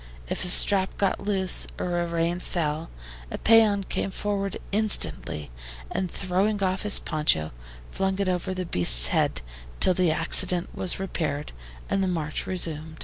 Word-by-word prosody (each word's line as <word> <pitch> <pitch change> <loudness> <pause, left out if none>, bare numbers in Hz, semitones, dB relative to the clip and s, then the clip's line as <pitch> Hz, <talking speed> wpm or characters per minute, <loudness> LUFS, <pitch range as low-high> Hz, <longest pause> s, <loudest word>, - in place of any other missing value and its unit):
If - - -2
a - - +4
strap 190 +1 +4
got 195 -2 0
loose, 195 -2 -1
or 175 -1 -2
a 170 - -1
rein 170 +1 -1
fell, 160 -3 -3 0.4
a - - -5
PEON 215 -3 +4
came 195 - -3
forward 200 0 -3
instantly, 200 - +1 0.4
and 185 -1 -2
throwing 195 +3 -1
off 185 0 0
his 210 -1 +5
poncho, 150 - 0 0.4
flung 190 0 -1
it 200 -1 -1
over 185 +1 -1
his 185 -1 -3
beast's 60 - +3
head - - 0 0.4
till 185 - +4
the 180 -1 +2
accident 165 +2 +2
was 185 0 -3
repaired 155 -6 -3 0.4
and 195 - 0
the - - 0
march 160 -4 -3
resumed. 160 -3 -3
180 Hz, 155 wpm, -25 LUFS, 160-195 Hz, 0.4 s, his